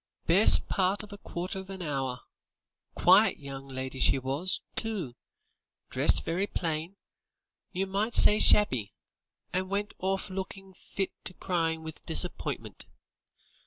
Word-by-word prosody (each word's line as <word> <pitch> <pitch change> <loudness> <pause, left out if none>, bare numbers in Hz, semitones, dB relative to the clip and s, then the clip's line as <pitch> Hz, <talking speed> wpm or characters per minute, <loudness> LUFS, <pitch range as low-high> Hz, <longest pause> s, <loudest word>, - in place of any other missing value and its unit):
"Best 190 +6 +6
part 195 +2 0
of 210 -1 -11
a 200 - -11
quarter 180 +2 -6
of 190 0 -11
a 190 -4 -7
hour. 135 -3 -3 0.7
Quiet 195 +5 +4
young 135 -1 -9
lady 130 0 -6
she - - +4
was, 140 +8 -1
too; 205 - -3 0.8
dressed - - +2
very 180 +5 -1
plain; 165 +1 -4 0.8
you 190 +2 -2
might 205 +4 -2
say 210 - +7
shabby; 130 - +4 0.6
and 185 +1 -2
went 205 +1 -3
orf 190 +1 -2
lookin' 190 0 -7
fit 195 +1 -5
to 185 - -6
cry 165 -3 -2
with 160 -1 -10
disappointment. - - -3
185 Hz, 130 wpm, -28 LUFS, 155-195 Hz, 0.8 s, say